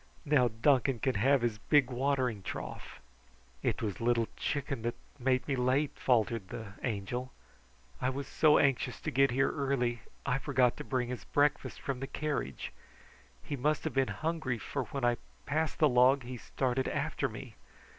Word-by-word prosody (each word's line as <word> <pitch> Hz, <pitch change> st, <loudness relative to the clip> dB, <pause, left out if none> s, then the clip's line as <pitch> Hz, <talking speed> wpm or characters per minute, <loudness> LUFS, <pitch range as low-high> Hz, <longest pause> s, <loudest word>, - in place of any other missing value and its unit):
Now 145 Hz, -4 st, +4 dB
Duncan 125 Hz, +3 st, +2 dB
can 130 Hz, +3 st, 0 dB
have 130 Hz, +5 st, +3 dB
his 115 Hz, -3 st, 0 dB
big 140 Hz, 0 st, +3 dB
watering 130 Hz, -4 st, 0 dB
trough." -, -, -7 dB, 0.6 s
"It -, -, -1 dB
was 105 Hz, -2 st, -3 dB
Little 115 Hz, -1 st, +2 dB
Chicken 140 Hz, -3 st, -2 dB
that 120 Hz, +1 st, -2 dB, 0.2 s
made 130 Hz, 0 st, +1 dB
me 140 Hz, -, +1 dB
late," 130 Hz, +3 st, +2 dB
faltered 115 Hz, -4 st, +1 dB
the 100 Hz, 0 st, -7 dB
Angel. 120 Hz, +3 st, -3 dB, 0.7 s
"I 125 Hz, -, +2 dB
was 135 Hz, +1 st, -3 dB
so 150 Hz, +1 st, +4 dB
anxious 130 Hz, -3 st, +1 dB
to -, -, -3 dB
get 135 Hz, +2 st, +4 dB
here 135 Hz, +2 st, +2 dB
early 130 Hz, -5 st, 0 dB, 0.2 s
I 135 Hz, -1 st, +1 dB
forgot 130 Hz, -4 st, +2 dB
to -, -, -5 dB
bring 125 Hz, -2 st, -1 dB
his 125 Hz, -5 st, -5 dB
breakfast 145 Hz, 0 st, +1 dB
from 135 Hz, -2 st, -3 dB
the 135 Hz, -, -4 dB
carriage. 145 Hz, -, -3 dB, 0.7 s
He 145 Hz, -, -3 dB
must 150 Hz, +3 st, 0 dB
have -, -, -2 dB
been 135 Hz, -1 st, +2 dB
hungry, 155 Hz, -6 st, -2 dB
for 130 Hz, +3 st, -3 dB
when 135 Hz, -4 st, -3 dB
I 120 Hz, 0 st, +3 dB, 0.3 s
passed 155 Hz, +1 st, 0 dB
the 155 Hz, -, +5 dB
log 130 Hz, +1 st, +5 dB
he 125 Hz, +1 st, -6 dB
started 130 Hz, +2 st, -1 dB
after 145 Hz, -2 st, -1 dB
me. 115 Hz, +1 st, -9 dB
130 Hz, 170 wpm, -32 LUFS, 120-140 Hz, 0.7 s, the